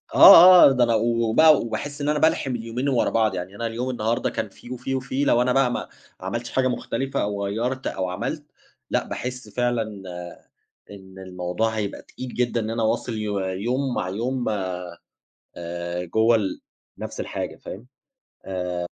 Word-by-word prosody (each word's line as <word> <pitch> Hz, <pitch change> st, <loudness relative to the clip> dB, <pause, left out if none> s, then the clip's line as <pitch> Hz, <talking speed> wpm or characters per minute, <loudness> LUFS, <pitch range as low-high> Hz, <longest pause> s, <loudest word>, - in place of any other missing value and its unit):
آه، 180 Hz, +1 st, +10 dB
آه، -, -, +4 dB
ده 125 Hz, -2 st, +3 dB
أنا 115 Hz, -1 st, +2 dB
وبقى 115 Hz, +7 st, +4 dB
وباحس 145 Hz, +5 st, -5 dB
إن 145 Hz, -, 0 dB
أنا 150 Hz, -, +1 dB
بالْحِم 140 Hz, -5 st, +1 dB
اليومين 120 Hz, +4 st, -3 dB
ورا 125 Hz, -, +2 dB
بعض، 110 Hz, -4 st, +1 dB
يعني 90 Hz, +2 st, -6 dB
أنا 115 Hz, +2 st, -3 dB
اليوم 120 Hz, +3 st, -3 dB
النهارده 115 Hz, -1 st, -1 dB
كان -, -, -4 dB
فيه 120 Hz, -, -14 dB
وفيه 125 Hz, +2 st, -3 dB
وفيه، 130 Hz, +2 st, -2 dB
لو 120 Hz, -3 st, +3 dB
أنا 125 Hz, 0 st, +2 dB
بقى 135 Hz, -2 st, +3 dB
ما -, -, -4 dB, 0.3 s
عملتش 115 Hz, +6 st, -5 dB
حاجة 130 Hz, -1 st, +1 dB
مختلفة 135 Hz, +2 st, -2 dB
أو 100 Hz, -1 st, -2 dB
غيَّرت 125 Hz, +6 st, -2 dB
أو 95 Hz, -1 st, -3 dB
عملت، 90 Hz, -, -4 dB, 0.5 s
لأ -, -, 0 dB
باحس 125 Hz, +1 st, -6 dB
فعلًا 120 Hz, -1 st, 0 dB, 1.1 s
إن 95 Hz, -1 st, -12 dB
الموضوع 90 Hz, +3 st, -2 dB
هيبقى 110 Hz, -2 st, -4 dB
تقيل 130 Hz, -1 st, -9 dB
جدًا 120 Hz, -1 st, 0 dB
إن 110 Hz, -, -4 dB
أنا 115 Hz, 0 st, -2 dB
أواصِل 110 Hz, +2 st, -1 dB
يو 105 Hz, -2 st, -2 dB
يوم 120 Hz, +8 st, -2 dB
مع 90 Hz, -, -2 dB
يوم، 120 Hz, +5 st, -2 dB, 1.1 s
آآ، 85 Hz, +1 st, -5 dB
جوه 110 Hz, +6 st, +3 dB
ال 100 Hz, -4 st, -2 dB, 0.4 s
نَفس -, -, -7 dB
الحاجة، -, -, -4 dB
فاهم؟ 110 Hz, +7 st, -10 dB, 0.8 s
آآ. 90 Hz, 0 st, -3 dB
115 Hz, 165 wpm, -23 LUFS, 100-130 Hz, 1.1 s, آه